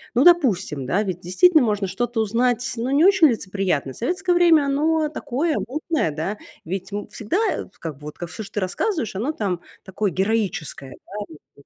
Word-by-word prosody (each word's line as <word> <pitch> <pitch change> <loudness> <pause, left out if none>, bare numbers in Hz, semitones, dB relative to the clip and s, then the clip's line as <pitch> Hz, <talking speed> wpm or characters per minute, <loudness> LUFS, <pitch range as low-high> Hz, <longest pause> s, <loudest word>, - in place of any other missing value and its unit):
Ну, 250 - +5
допустим, 205 - +3
да, 185 +11 +1
ведь 185 -4 -3
действительно 300 - +4
можно 210 -4 +1
что-то 225 +5 -1
узнать, 240 +3 +1
ну, 235 +3 -2
не 285 +3 +4
очень 385 -3 +6
лицеприятное. 190 - -1
Советское 360 - -1
время- 340 -3 +5
оно 305 +2 +1
такое 305 +2 -1
мутное, 300 - -1
да. 160 +8 -3 0.3
Ведь, 190 +3 -5
м, 205 0 -4
всегда, 215 +8 -4 0.2
э, - - -3 0.2
как 160 -3 -5
бы, 145 - -18
вот 150 0 -8
ка 175 - -4
всё, 220 +6 -7
что 205 - -12
ты - - -1
рассказываешь, 225 - -2
оно 260 +10 -1
там 195 - -2 0.2
такое 195 +2 -2
героическое, 190 -9 -2
да, - - -11 0.3
ну, 155 - -13 0.2
как 140 - -20
215 Hz, 190 wpm, -22 LUFS, 185-295 Hz, 0.3 s, очень